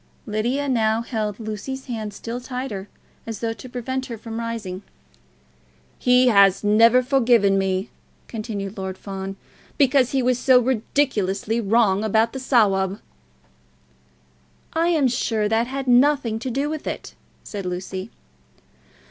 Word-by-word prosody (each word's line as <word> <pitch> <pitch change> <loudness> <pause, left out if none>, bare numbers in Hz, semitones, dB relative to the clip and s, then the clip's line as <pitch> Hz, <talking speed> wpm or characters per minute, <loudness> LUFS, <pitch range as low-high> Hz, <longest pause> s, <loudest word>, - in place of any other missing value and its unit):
Lydia 240 +6 -1
now 225 -3 +1
held 215 -3 -3
Lucy's 225 +5 -5
hand 220 -4 -4
still 230 +4 -6
tighter, 250 -6 -5 0.4
as 225 -1 -4
though 225 -1 -2
to 225 +4 -11
prevent 260 +2 -4
her 235 - -5
rising. 225 -5 -4 1.2
"He 250 0 +4
has 200 -3 +5
never 230 +4 +5
forgiven 235 -6 +3
me," 190 +1 -1 0.4
continued 210 -3 -5
Lord 190 0 -4
Fawn, 195 -1 -6 0.4
"because 265 -3 +4
he 265 -2 0
was 250 0 +2
so 255 -1 +5
ridiculously 225 -4 0
wrong 210 -2 +2
about 220 +1 +2
the 265 - -4
Sawab." 200 -7 +2 1.7
"I 330 +1 +2
am 315 -6 +3
sure 225 -3 0
that 225 +2 +1
had 270 +1 -4
nothing 250 -2 +3
to 255 - -4
do 275 +4 -1
with 310 0 -5
it," - - -5 0.3
said 200 -3 -6
Lucy. 185 +2 -5
230 Hz, 130 wpm, -22 LUFS, 205-255 Hz, 1.7 s, has